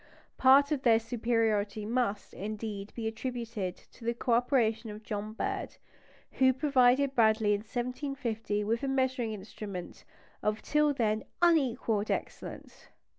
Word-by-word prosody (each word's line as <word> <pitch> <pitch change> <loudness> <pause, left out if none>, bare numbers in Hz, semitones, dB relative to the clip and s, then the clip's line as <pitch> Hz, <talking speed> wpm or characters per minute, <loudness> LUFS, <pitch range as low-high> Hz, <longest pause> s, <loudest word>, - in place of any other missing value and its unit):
Part 275 +2 +6
of 290 -3 0
their 230 -4 +5
superiority 225 -3 0
must, 220 -3 -1
indeed, 210 0 -5
be 225 -2 -3
attributed 225 -4 -4 0.2
to - - -16
the 235 +1 -1
co 240 - -2
operation 235 -2 +2
of 210 +1 -8
John 210 0 -4
Bird, - - -3 0.6
who 260 0 +6
provided 265 0 +3
Bradley 220 -3 +4
in 205 - 0
1750 240 -2 -3
with 230 +3 0
a 275 - -2
measuring 260 -3 0
instrument 200 -2 -8 0.4
of 210 +1 -1
till 300 -1 +3
then 220 -5 0 0.2
unequalled 245 -10 +2
excellence. - - -5
230 Hz, 130 wpm, -30 LUFS, 215-260 Hz, 0.6 s, Part